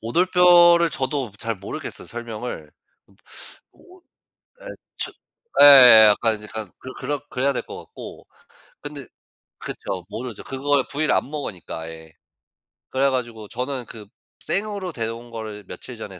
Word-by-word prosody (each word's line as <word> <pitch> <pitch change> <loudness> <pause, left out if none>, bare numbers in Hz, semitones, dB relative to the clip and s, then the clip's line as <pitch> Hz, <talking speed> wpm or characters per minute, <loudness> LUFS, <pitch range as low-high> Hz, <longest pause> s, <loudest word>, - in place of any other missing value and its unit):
오돌뼈를 175 - +5
저도 130 -3 -3
잘 115 0 -3
모르겠어요 100 - -7
설명을. 115 -9 -7 1.0
오 370 -1 -20 0.6
예 - - -13 0.3
저 - - -3 0.5
예 125 -6 +10
약간 110 0 +1
약간 105 -2 -7 0.3
그렇 145 -1 -3
그래야 135 +2 0
될 - - -2
것 - - -9
같고. - - -11 0.6
근데 145 -3 -8 0.5
그쵸. 90 -3 -6
모르죠. 120 -1 -7
그걸 135 0 0
부위를 150 +2 0
안 - - 0
먹으니까 105 - -6
아예. 80 0 -10 0.8
그래 135 +1 +2
가지고 120 -5 -4
저는 125 +1 -4
그 110 -2 -11 0.3
생으로 200 -3 -3
데려온 115 -2 -6
거를 110 -2 -7
며칠 125 -3 -9
전에 95 -4 -9
125 Hz, 265 characters per minute, -22 LUFS, 110-145 Hz, 1.0 s, 예